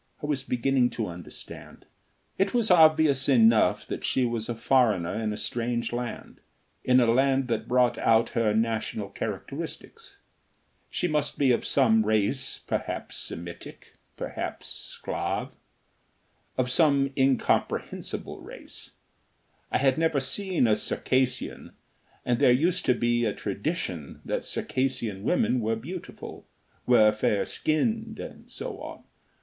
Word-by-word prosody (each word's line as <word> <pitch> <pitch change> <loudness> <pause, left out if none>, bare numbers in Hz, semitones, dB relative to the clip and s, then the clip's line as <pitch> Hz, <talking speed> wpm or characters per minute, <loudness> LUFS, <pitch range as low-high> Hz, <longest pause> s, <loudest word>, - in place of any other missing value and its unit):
I - - -1
was 145 -2 0
beginning 125 0 +1
to 110 - 0
understand. 85 -2 -10 0.5
It 195 +4 +1
was 230 -4 +2
obvious 155 -5 +5
enough 115 -4 +4
that - - -5
she 130 - +1
was 115 -2 -3
a 120 - -2
foreigner 110 -9 +2
in 110 0 -2
a 105 - -4
strange 120 0 -2
land, 120 -1 -5 0.4
in 130 0 +5
a 120 - +4
land 135 +3 +2
that 115 -2 -1
brought 125 0 +2
out 115 +1 +3
her 115 -4 +1
national 110 -2 -1
characteristics. 160 - -6 0.7
She 180 - -1
must 150 -2 -1
be 135 -3 +3
of 120 - 0
some 110 -5 +4
race, 110 +5 0
perhaps - - -3
Semitic, 85 0 -8 0.2
perhaps - - -5 0.3
Sclav - - -3 1.1
of 125 -1 0
some 140 -2 +3
incomprehensible 135 -2 0
race. - - -11 0.8
I - - +3
had 135 +1 +2
never 160 -3 +2
seen 180 +4 0
a 110 -2 +4
Circassian, 130 +4 -1 0.5
and 120 -1 +1
there - - +6
used 165 +8 +2
to 125 - +4
be 120 0 +1
a 105 -3 +1
tradition 100 - -4
that - - -2
Circassian 125 -7 -2
women 125 +4 +1
were 115 0 0
beautiful, 170 +10 -8 0.4
were 110 -4 +6
fair 105 -1 0
skinned, 220 +8 -1
and - - -9
so - - -6
on. - - -9
125 Hz, 135 wpm, -27 LUFS, 110-140 Hz, 1.1 s, there